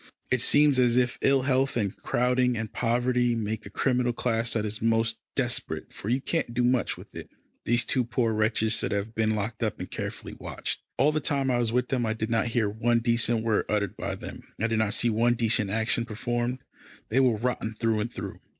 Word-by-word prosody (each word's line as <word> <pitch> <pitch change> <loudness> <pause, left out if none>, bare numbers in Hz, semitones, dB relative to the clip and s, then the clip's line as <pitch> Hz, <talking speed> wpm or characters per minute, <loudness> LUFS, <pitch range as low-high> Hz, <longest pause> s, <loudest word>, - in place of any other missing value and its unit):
It 130 -2 +2
seems 145 -2 +4
as 120 -1 +3
if 125 -1 +1
ill 135 -1 +3
health, 130 -1 +1
and 100 -3 -1
crowding 125 0 +1
and 110 -1 -5
poverty, 120 0 +1
make 110 -2 -3
a - - -9
criminal 125 +2 +1
class 115 -1 0
that 110 -2 0
is 105 0 -2
the - - -3
most 115 0 +1 0.2
desperate, - - -2
for 105 - -5
you 125 +3 +2
can't 135 -4 -2
do 125 - +2
much 125 -2 +1
with - - -13
it. - - -8 0.4
These 120 +1 +2
two 130 - +2
poor 115 -1 0
wretches 110 0 +1
should - - -1
have 100 +2 -2
been 110 -1 +1
locked 110 +2 -4
up 110 -3 -1
and - - -7
carefully - - -5
watched. - - -4 0.2
All 140 +4 +4
the 155 - 0
time 140 -2 0
I 120 - +1
was 115 -2 +1
with 125 +1 0
them 125 -3 0
I 110 - 0
did 110 0 -3
not 115 +1 +2
hear 115 -2 +1
one 115 +3 +1
decent 115 -1 +2
word 110 -2 +1
uttered 105 -1 0
by - - -4
them, - - -9 0.2
I 110 - +1
did 115 -1 +1
not 110 -2 +1
see 120 - +2
one 120 +2 +2
decent 110 -3 +1
action 110 +3 0
performed. 120 +3 -3 0.5
They 125 - +2
were 125 -4 +3
rotten 115 -1 -2
through 110 0 0
and 110 +3 -2
through. - - -7
115 Hz, 225 wpm, -27 LUFS, 110-125 Hz, 0.5 s, seems